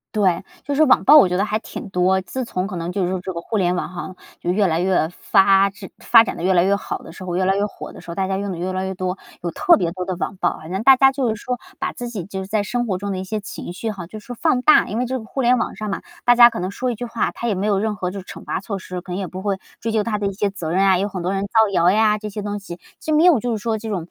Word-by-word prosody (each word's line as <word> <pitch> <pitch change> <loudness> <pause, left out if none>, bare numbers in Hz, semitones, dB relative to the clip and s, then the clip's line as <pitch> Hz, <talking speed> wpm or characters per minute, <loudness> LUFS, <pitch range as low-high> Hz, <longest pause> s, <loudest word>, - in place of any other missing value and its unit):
对， 190 -5 +2 0.2
就 285 +1 -2
是 310 - +5
网 - - +4
暴 300 - +8
我 285 -11 +8
觉 180 - 0
得 200 - +1
还 215 0 -1
挺 220 - -8
多。 185 +1 +2
自 255 +7 -5
从 185 -5 -3
可 195 - -6
能 170 0 -3
就 190 +1 -1
是 175 - -1
说 185 -1 -2
这 185 - -5
个 170 - -5
互 195 +6 -5
联 180 -2 +1
网 - - -3
哈， 185 +1 -7 0.3
就 175 - 0
越 200 +1 +2
来 165 0 0
越 180 -3 +2
发 195 +1 +4
制 195 -1 -11
发 230 -1 +6
展 - - -4
得 - - -7
越 190 +1 +3
来 175 -1 +4
越 195 +2 +3
好 200 - -4
的 - - -13
时 185 - -10
候， 180 -1 -3
越 185 - +1
来 195 - +2
越 200 +1 +1
火 210 - -9
的 - - -11
时 170 - -9
候， - - -6
大 190 0 -1
家 190 - -1
用 200 0 -3
得 175 - -5
越 185 +2 -3
来 185 0 -2
越 190 - -3
多， 185 0 -3 0.2
有 170 -1 -3
特 340 - +4
别 170 - 0
多 180 +1 -4
的 185 - -2
网 190 - -3
暴。 185 - -1
好 155 - -11
像 190 +5 -3
大 265 0 +7
家 270 0 +5
就 265 -3 0
是 220 - -1
说 250 -1 -2 0.2
把 - - -2
自 245 -1 -6
己 200 -8 -5
就 190 0 -5
是 190 - -9
在 215 0 0
生 240 +4 -2
活 190 -4 -1
中 200 +1 -4
的 - - -3
一 - - -4
些 215 +3 -3
情 195 -3 -7
绪 220 +5 -4
哈， 195 -5 -6
就 215 +5 -9
是 - - -19
说 245 - -7
放 250 0 +2
大。 305 - +6
因 215 - -3
为 250 - 0
这 260 +1 -2
个 230 - -8
互 265 +4 -4
联 250 0 +4
网 230 - -3
上 215 -1 -4
嘛， 195 - -3 0.2
大 245 0 +6
家 240 0 +9
可 - - -6
能 185 +2 -3
说 250 +4 -2
一 235 - -4
句 245 - -5
话， 230 -2 -1
他 235 - -5
也 210 - +1
没 190 +2 -2
有 205 -2 +2
任 215 0 -1
何 180 -1 -3
就 200 - -6
是 185 - -11
惩 - - -10
罚 - - -3
措 200 +1 -5
施， 185 -1 -6
可 180 0 -8
能 - - -3
也 195 -2 -3
不 185 +2 -7
会 195 -1 -1 0.2
追 225 0 -3
究 215 -1 +2
他 210 -1 -1
的 205 -1 -1
一 195 - -3
些 205 +1 0
责 170 -5 -5
任 190 +1 +3
啊， 190 -2 +5
有 200 +2 0
很 185 -3 -5
多 180 - 0
人 195 - -1
造 220 +1 +3
谣 175 -2 +4
呀 210 +2 +3
这 215 0 -6
些 210 +1 -5
东 205 0 -4
西， 175 -3 -9 0.2
就 310 - -1
没 310 - +4
有 345 -8 +6
就 245 +3 -2
是 220 - -1
说 225 -2 0
这 220 +1 -7
种 180 -5 -3
200 Hz, 375 characters per minute, -21 LUFS, 185-220 Hz, 0.3 s, 家